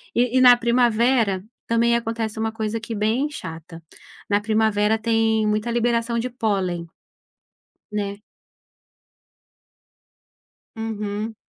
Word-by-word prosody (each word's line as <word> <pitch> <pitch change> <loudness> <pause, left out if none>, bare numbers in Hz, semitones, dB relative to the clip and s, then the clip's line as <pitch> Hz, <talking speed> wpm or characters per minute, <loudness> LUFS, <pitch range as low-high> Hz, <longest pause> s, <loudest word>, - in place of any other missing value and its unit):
E 245 +1 +2
e - - +5
na 250 -1 +8
primavera, 235 -4 +2 0.2
também 235 +1 +2
acontece 225 -1 -3
uma 225 0 -1
coisa, 220 0 -3
aqui 225 +1 -6
bem 220 +8 0
chata. 165 - -9 0.5
Na 205 0 +2
primavera 215 0 +2
tem 220 -1 +1
muita 215 +2 0
liberação 235 0 0
de 250 +2 -2
pólen, 195 -8 -1 1.1
né. 200 -1 -3 2.6
Uhum. 215 0 -4
225 Hz, 105 wpm, -22 LUFS, 210-235 Hz, 2.6 s, na